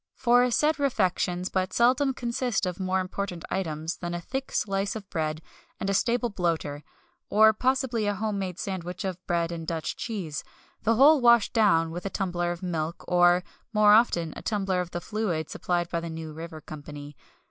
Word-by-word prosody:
For 245 0 +4
said 300 +5 +2
refections 185 -8 0
but 185 -1 -1
seldom 260 +3 +3
consist 240 -2 -1
of 180 0 -4
more 190 0 0
important 185 -2 -4
items 160 -3 -2
than 175 0 -4
a - - -3
thick 265 +9 -5
slice 195 0 -1
of 205 -3 -7
bread 155 -1 -2 0.4
and 195 - -1
a - - 0
stale 240 +4 +1
bloater; 165 -7 -2 0.5
or 220 +1 +6
possibly 250 -2 0
a 205 - 0
home 210 0 -2
made 185 -2 -4
sandwich 185 -3 -4
of 185 -1 -4
bread 170 -1 0
and 165 -1 -6
Dutch 165 -2 -2
cheese 190 -10 -4 0.4
the 225 +1 +2
whole 285 +4 +6
washed 235 -3 +5
down 180 -8 +3
with 175 +3 -4
a - - -2
tumbler 175 -2 -1
of 175 +1 -6
milk, 165 -2 -3
or 175 0 +4 0.3
more 210 -1 +6
often 175 -8 +3
a - - -7
tumbler 195 -4 0
of 180 - -5
the 175 - -5
fluid 185 -8 -2
supplied 175 -1 -1
by 170 - 0
the 170 0 -6
New 160 -1 -6
River 160 0 -8
Company. 145 -1 -9
185 Hz, 185 wpm, -27 LUFS, 170-220 Hz, 0.5 s, or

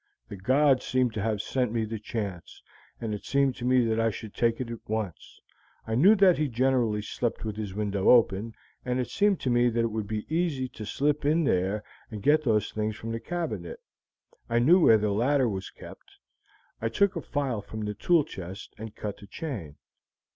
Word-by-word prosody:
The - - -6
god 130 +7 +3
seemed 130 -3 0
to 110 - -3
have 110 -1 -1
sent 125 -2 -1
me 115 -1 0
the 110 0 -5
chance, 100 -5 -6 0.4
and 110 -2 -3
it 105 - -6
seemed 140 -2 +1
to 120 - -5
me 125 -1 +4
that 110 0 0
I 115 0 +3
should 110 0 -8
take 115 -1 +1
it 120 -2 -4
at 115 - -6
once. 110 -5 -4 0.5
I 110 - -3
knew 180 - +6
that 195 -5 +5
he 155 - +1
generally 120 -4 +1
slept 115 +2 -3
with 110 -2 -3
his 105 -3 -5
window 100 -2 0
open, 110 -2 +4 0.3
and 125 0 -1
it 125 - -3
seemed 205 -1 +2
to 130 - 0
me 120 0 +4
that 115 0 0
it 115 -1 0
would 110 -1 -3
be 105 0 -3
easy 160 -5 -1
to 105 -4 -8
slip 145 +1 0
in 155 +3 +2
there 95 -3 0 0.3
and 105 -3 -7
to - - +3
get 155 0 +3
those 110 -5 +1
things 110 0 -2
from 115 +1 -6
the 115 - -3
cabinet. 130 - -4 0.7
I 120 - +1
knew 155 +10 +6
where 115 -10 +6
the 105 -1 0
ladder 130 +5 +2
was 95 -3 -4
kept. - - -14 0.7
I 115 - 0
took 195 - +2
a 165 - -3
file 135 -8 -2
from 110 +2 -7
the 105 0 -3
tool 165 - +3
chest 95 - -9
and 110 -1 -8
cut 105 -2 -5
the 100 - -13
chain." 100 - -6
115 Hz, 210 wpm, -27 LUFS, 105-135 Hz, 0.7 s, knew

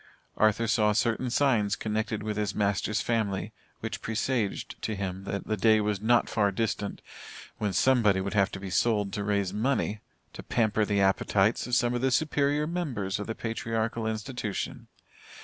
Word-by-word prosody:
Arthur 110 +1 +3
saw 105 -1 +3
certain 115 +3 0
signs 120 -6 +2
connected 110 0 -2
with 105 0 -2
his 105 -2 -2
master's 100 +1 0
family 105 -3 -1 0.3
which 110 - -4
presaged 110 -1 -2
to 110 - -2
him 95 -1 -4
that 100 0 -4
the 110 - -1
day 110 +1 +4
was 105 -2 -1
not 115 +2 +3
far 105 -3 +1
distant, 105 0 -2 0.6
when 105 -2 0
somebody 110 -4 +3
would 95 +1 -3
have 100 -2 +3
to 95 - -5
be 95 -1 -6
sold 105 -1 +1
to 105 -2 -2
raise 100 -2 0
money 110 -1 0 0.3
to - - -8
pamper 110 -2 +1
the 100 -1 +1
appetites 95 +3 +2
of 125 - +1
some 120 0 +2
of 120 - -1
the 135 - +2
superior 145 +1 +1
members 135 - -2
of 105 - -5
the 110 - -3
patriarchal 115 0 -2
institution. 110 -1 -4
110 Hz, 170 wpm, -28 LUFS, 100-115 Hz, 0.6 s, day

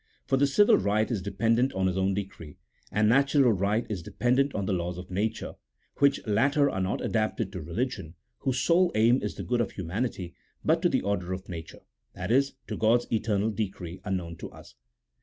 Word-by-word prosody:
For - - +1
the 140 +1 +3
civil 205 +10 +5
right 105 +4 +1
is 110 -5 -1
dependent 115 +6 +1
on 95 0 0
his 90 -1 +1
own 95 0 +1
decree; 95 -6 -7 0.3
and 105 0 +2
natural 135 +1 +4
right 105 +3 0
is 100 -5 -4
depen 120 +8 0
dent 140 +1 +1
on 100 - -1
the 95 - 0
laws 90 0 -2
of 90 +1 -9
nature, 105 +4 -2 0.4
which 140 -1 +2
latter 140 +7 +2
are 95 - -2
not 95 - -1
adapted 110 -2 -1
to 90 -4 -6
religion, 85 - -4 0.2
whose 130 -1 -1
sole 175 +6 +3
aim 115 +4 +4
is - - -4
the - - -6
good 120 -1 0
of 110 - -3
humanity, 95 -1 -3 0.3
but - - +3
to - - +3
the - - 0
order 95 -3 -1
of 95 +1 -7
nature 80 -2 -8 0.2
— - - -49
that 95 +4 -4
is, 135 +3 +3
to - - -5
God's 115 +2 +3
eternal 110 -1 +1
decree 95 -4 -5
unknown 90 -4 -3
to - - -7
us. - - -15
105 Hz, 205 wpm, -27 LUFS, 95-125 Hz, 0.4 s, civil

